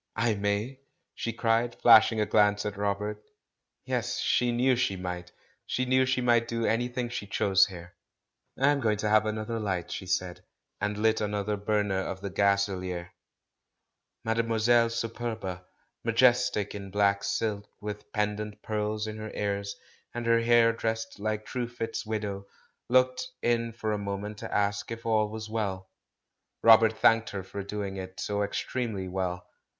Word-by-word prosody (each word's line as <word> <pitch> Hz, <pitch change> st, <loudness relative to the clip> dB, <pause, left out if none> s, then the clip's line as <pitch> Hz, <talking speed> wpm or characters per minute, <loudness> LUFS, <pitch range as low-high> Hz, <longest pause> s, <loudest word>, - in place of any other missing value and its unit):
"I 110 Hz, 0 st, +2 dB
may?" 105 Hz, +6 st, -2 dB, 0.3 s
she 115 Hz, -, -3 dB
cried, 115 Hz, +1 st, +1 dB
flashing 110 Hz, -1 st, +7 dB
a 105 Hz, -, +2 dB
glance 105 Hz, 0 st, +3 dB
at 105 Hz, -1 st, -3 dB
Rob 100 Hz, 0 st, -1 dB
ert. 105 Hz, 0 st, -4 dB, 0.6 s
Yes, -, -, -1 dB
she 125 Hz, -1 st, +2 dB
knew 125 Hz, +2 st, +3 dB
she 120 Hz, -5 st, 0 dB
might! 90 Hz, -1 st, -5 dB, 0.4 s
She 130 Hz, -, 0 dB
knew 130 Hz, +1 st, +3 dB
she 130 Hz, 0 st, +1 dB
might 120 Hz, -1 st, +3 dB
do 115 Hz, -1 st, -1 dB
anything 120 Hz, +1 st, 0 dB
she 105 Hz, -3 st, -5 dB
chose 95 Hz, 0 st, +3 dB
there. 90 Hz, -2 st, -10 dB, 0.6 s
"I'm 140 Hz, +1 st, +3 dB
going 110 Hz, -4 st, +1 dB
to 105 Hz, +1 st, -1 dB
have 110 Hz, 0 st, +4 dB
more 110 Hz, 0 st, -2 dB
light!" 95 Hz, -5 st, -2 dB
she 95 Hz, -, -5 dB
said, 90 Hz, -1 st, -2 dB, 0.4 s
and 105 Hz, 0 st, -1 dB
lit 110 Hz, +1 st, +2 dB
another 105 Hz, 0 st, -1 dB
burner 105 Hz, -1 st, 0 dB
of 95 Hz, 0 st, -4 dB
the 100 Hz, -, -4 dB
gaselier. 95 Hz, -3 st, 0 dB, 1.1 s
Mademoiselle 115 Hz, +1 st, +3 dB
Superba 115 Hz, -5 st, -4 dB, 0.2 s
— -, -, -47 dB
majestic 120 Hz, -2 st, +3 dB
in 100 Hz, -1 st, -7 dB
black 100 Hz, 0 st, +2 dB
silk, 105 Hz, -2 st, -2 dB
with 105 Hz, 0 st, -7 dB
pendent 105 Hz, 0 st, -2 dB
pearls 105 Hz, 0 st, -2 dB
in 110 Hz, 0 st, -5 dB
her 110 Hz, 0 st, -6 dB
ears, 100 Hz, -1 st, -2 dB, 0.4 s
and 120 Hz, 0 st, -3 dB
her 115 Hz, 0 st, +4 dB
hair 115 Hz, 0 st, +5 dB
dressed 115 Hz, -1 st, -3 dB
like 110 Hz, 0 st, -2 dB
Truefitt's 120 Hz, -3 st, -4 dB
window 100 Hz, -2 st, -3 dB, 0.2 s
— -, -, -47 dB
looked 130 Hz, -, +2 dB
in 115 Hz, -1 st, +1 dB
for 110 Hz, -1 st, -3 dB
a 105 Hz, -, -1 dB
moment 100 Hz, +1 st, -4 dB
to -, -, -7 dB
ask 100 Hz, 0 st, 0 dB
if 115 Hz, 0 st, -7 dB
all 110 Hz, -2 st, +2 dB
was 110 Hz, 0 st, -6 dB
well. 100 Hz, -4 st, -3 dB, 0.7 s
Robert 110 Hz, -1 st, +7 dB
thanked 115 Hz, 0 st, +4 dB
her 100 Hz, -2 st, -5 dB
for 100 Hz, +2 st, -6 dB
doing 100 Hz, -1 st, -4 dB
it 95 Hz, 0 st, -7 dB
so 105 Hz, 0 st, -1 dB
extremely 105 Hz, -1 st, -2 dB
well. 90 Hz, -1 st, -3 dB
105 Hz, 160 wpm, -28 LUFS, 100-115 Hz, 1.1 s, flashing